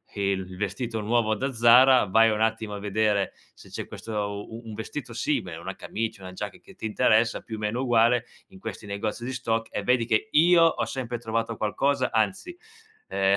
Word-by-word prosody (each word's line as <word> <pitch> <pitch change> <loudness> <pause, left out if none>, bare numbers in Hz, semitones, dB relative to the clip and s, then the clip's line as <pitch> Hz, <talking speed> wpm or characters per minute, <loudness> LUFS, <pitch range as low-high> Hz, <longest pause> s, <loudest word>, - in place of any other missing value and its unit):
il 95 -2 -2
vestito 110 +4 -3
nuovo 110 0 +1
da 135 +5 -3
Zara, 125 +2 +6
vai 115 +3 +4
un 105 0 -1
attimo 110 -1 0
a 100 - -5
vedere 105 0 0 0.2
se - - -16
c'è - - -5
questo 115 - -9 0.4
u 115 +1 -8
un 110 - -7
vestito 110 +1 -6
simile, - - -2
una - - -6
camicia, 110 -2 -5
una 95 0 -8
giacca 100 +2 -6
che - - -17
ti 145 - -8
interessa, 110 +2 +2
più 110 - -7
o - - -8
meno 105 +4 -2
uguale 120 -1 +3 0.2
in 190 - -16
questi 115 - -7
negozi 105 +3 -3
di 130 +2 -4
stock 115 -2 -2
e 105 - -3
vedi 125 +2 +2
che 110 -1 0
io 170 +2 +6
ho 165 - +2
sempre 125 -2 -4
trovato 115 0 -2
qualcosa, 130 +5 0
anzi, 110 - -1 0.5
ehm, 95 0 +2
115 Hz, 195 wpm, -26 LUFS, 105-120 Hz, 0.5 s, Zara